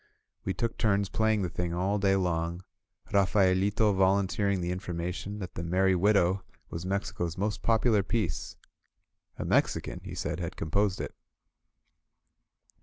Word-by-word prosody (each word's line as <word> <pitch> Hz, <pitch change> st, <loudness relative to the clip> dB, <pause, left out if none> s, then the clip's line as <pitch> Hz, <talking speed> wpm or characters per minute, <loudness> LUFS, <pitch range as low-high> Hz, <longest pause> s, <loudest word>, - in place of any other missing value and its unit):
We 95 Hz, -, -1 dB
took 115 Hz, -1 st, -2 dB
turns 100 Hz, -2 st, +2 dB
playing 110 Hz, -2 st, +1 dB
the 90 Hz, -, -1 dB
thing 85 Hz, -1 st, -3 dB
all 95 Hz, +4 st, 0 dB
day 95 Hz, 0 st, +3 dB
long; 85 Hz, -1 st, -1 dB, 0.5 s
Rafaelito 100 Hz, +1 st, +3 dB
volunteering 100 Hz, +1 st, +2 dB
the 90 Hz, 0 st, -2 dB
information, 90 Hz, +2 st, -4 dB
that 95 Hz, -4 st, -6 dB
the -, -, -4 dB
"Merry 95 Hz, +3 st, +2 dB
Widow" 95 Hz, -1 st, +3 dB, 0.3 s
was 80 Hz, +2 st, -5 dB
Mexico's 95 Hz, -4 st, -2 dB
most 105 Hz, +2 st, -1 dB
popular 115 Hz, -2 st, +3 dB
piece. 95 Hz, -, -2 dB, 0.8 s
A -, -, -4 dB
Mexican, -, -, +1 dB
he -, -, -7 dB
said, 80 Hz, -, -3 dB
had 85 Hz, 0 st, -5 dB
composed 95 Hz, +4 st, 0 dB
it. -, -, -5 dB
95 Hz, 135 wpm, -29 LUFS, 90-100 Hz, 0.8 s, day